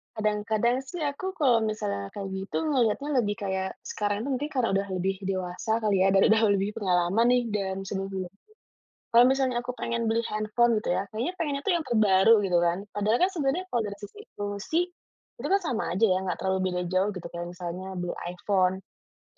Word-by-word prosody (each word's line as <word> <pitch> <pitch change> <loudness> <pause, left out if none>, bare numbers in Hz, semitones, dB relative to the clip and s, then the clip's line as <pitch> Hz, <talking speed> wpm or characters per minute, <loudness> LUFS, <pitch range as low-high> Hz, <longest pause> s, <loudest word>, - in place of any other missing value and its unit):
kadang-kadang 215 +3 +1
sih 345 -1 -5
aku 335 +7 -3
kalau 255 -7 +4
misalnya 100 - -2
kayak 200 -1 -4
gitu 190 +1 -5 0.2
melihatnya 255 +2 +1
lebih 205 -3 0
kayak 190 -1 -1
sekarang 205 0 -2
tuh 280 - -3
mungkin 290 +4 -2
karena 255 -4 +1
udah 200 0 0
lebih 190 +2 0
dewasa 185 +2 -3
kali 210 -2 +2
ya 195 - +4
dan 195 - +6
udah 220 +1 +5
lebih 195 +1 0
pengalaman 185 +3 +2
nih 250 - +4
dari 195 -2 -2
sebelum-sebelum. 190 -2 -4 0.8
Kalau 235 +1 +7
misalnya 260 -1 +2
aku 250 - -3
pengen 235 0 -1
beli 225 +1 +1
handphone 215 +2 +2
gitu 210 - -1
ya 190 - 0
kayaknya 235 +11 -2
pengennya 285 -4 -1
tuh 400 - +3
yang 340 - 0
terbaru 210 -2 +5
gitu 180 -2 +2
kan 175 +1 +2 0.2
padahal 210 +3 +2
kan 375 - +1
sebenarnya 315 +3 0
kalau 235 - +2
dari 200 - -7
sisi 205 - -11 0.2
fungsi, 205 +9 -2 0.6
itu - - -3
kan 395 - +4
sama 245 -8 -1
aja 220 - +3
ya 185 -2 +2
nggak 190 - -2
terlalu 190 0 0
beda 180 - -2
jauh 185 +2 +2
gitu 185 -4 -7
kayak 175 0 -5
misalnya 180 +1 -6
beli 175 0 -3 0.2
iPhone, 185 +1 +1 0.6
karena - - -44
210 Hz, 195 wpm, -27 LUFS, 190-240 Hz, 0.8 s, Kalau